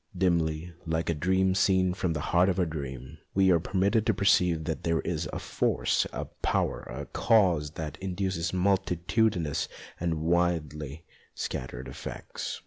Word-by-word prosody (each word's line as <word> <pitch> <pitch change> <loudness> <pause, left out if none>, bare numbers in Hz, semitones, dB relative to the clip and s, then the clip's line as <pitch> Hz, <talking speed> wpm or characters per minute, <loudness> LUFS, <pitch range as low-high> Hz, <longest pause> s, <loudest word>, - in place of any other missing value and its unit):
Dimly, 85 -2 +1
like 80 +1 0
a - - +1
dream 95 +4 +2
seen 95 -1 +3
from 90 -2 -1
the 75 - -3
heart 90 +2 +5
of 95 - 0
a 90 - +3
dream, 70 -2 -6 0.2
we 95 -1 +5
are 85 - +5
permitted 100 +5 +1
to 110 - +3
perceive 90 -4 +3
that 80 0 -3
here 85 -1 +2
is - - -2
a - - -4
Force, - - +1
a - - -4
Power, - - -1
a 70 +3 -5
Cause 90 -10 +3
that 75 -2 -5
induces 95 -3 -2
multitudinous 95 -2 +1 0.3
and 80 -2 -1
widely 80 -3 0 0.3
scattered 65 0 -4
effects. - - -6
85 Hz, 150 wpm, -28 LUFS, 80-95 Hz, 0.3 s, heart